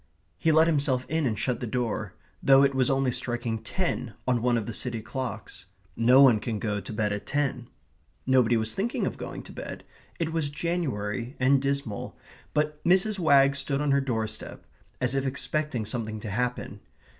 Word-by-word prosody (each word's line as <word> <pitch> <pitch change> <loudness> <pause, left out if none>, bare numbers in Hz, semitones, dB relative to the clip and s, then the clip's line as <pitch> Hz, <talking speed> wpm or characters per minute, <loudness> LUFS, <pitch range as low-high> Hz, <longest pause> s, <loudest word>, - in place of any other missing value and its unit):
He 160 - +3
let 160 +1 +6
himself 140 -5 +1
in 160 -3 +1
and 110 -3 -1
shut 125 +2 -1
the 120 - -4
door, 120 -1 -2 0.3
though 135 0 +6
it 140 0 +3
was 130 -2 +2
only 135 -1 +2
striking 120 -2 -2
ten 125 - -3
on 125 -2 +2
one 120 0 +2
of 110 - -2
the 115 - -5
city 120 +1 -2
clocks. 115 -4 -6 0.3
No 125 +4 +6
one 120 -6 +6
can 110 0 -3
go 105 -1 -2
to - - -8
bed 105 -1 0
at 100 - -6
ten. 135 -4 -1 0.6
Nobody 125 -3 +4
was 110 0 -1
thinking 225 +5 -1
of - - -4
going - - -6
to - - -12
bed. - - -7 0.4
It 165 -1 -1
was 160 -3 0
January 135 -7 -2
and 130 +1 +4
dismal, 140 -6 -3 0.4
but 150 0 0
Mrs. 190 +4 +3
Wagg 140 -4 +5
stood 140 0 -1
on 145 -1 +1
her 140 0 +3
doorstep, 110 -4 -4 0.3
as 125 0 0
if 135 -1 0
expecting 140 -3 -2
something 110 -1 -4
to 105 - -5
happen. 125 +3 -2
130 Hz, 185 wpm, -27 LUFS, 115-145 Hz, 0.6 s, let